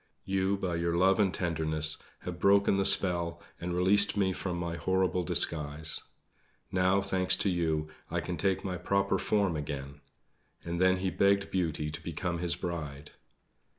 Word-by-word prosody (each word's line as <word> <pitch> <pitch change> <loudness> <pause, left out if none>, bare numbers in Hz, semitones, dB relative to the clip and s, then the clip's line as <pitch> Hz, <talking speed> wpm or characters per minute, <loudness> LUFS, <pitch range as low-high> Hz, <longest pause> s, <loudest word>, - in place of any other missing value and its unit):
You, 95 +1 0
by 90 -3 -2
your 85 0 -1
love 95 +3 +3
and 100 -3 +3
tenderness, 80 -3 -1 0.2
have 90 -1 -6
broken 100 +1 +4
the 100 - +1
spell 85 -4 +3 0.2
and 90 0 -3
released 100 +3 +3
me 95 -2 +1
from 90 -1 -4
my 85 -1 -3
horrible 95 +1 0
disguise. 80 -3 +1 0.7
Now, 95 +1 +2
thanks 95 -1 +2
to 100 - 0
you, 80 -3 -1 0.2
I - - -1
can 90 - -4
take 95 +3 0
my 90 -2 -3
proper 100 +3 0
form 100 -5 +1
again." 70 -1 -6 0.6
And 85 +1 -3
then 95 0 +4
he 95 0 -2
begged 100 0 +2
Beauty 80 -5 -1
to 75 - -7
become 85 -1 -4
his 85 0 +1
bride. 75 -5 -6
90 Hz, 160 wpm, -30 LUFS, 85-95 Hz, 0.7 s, broken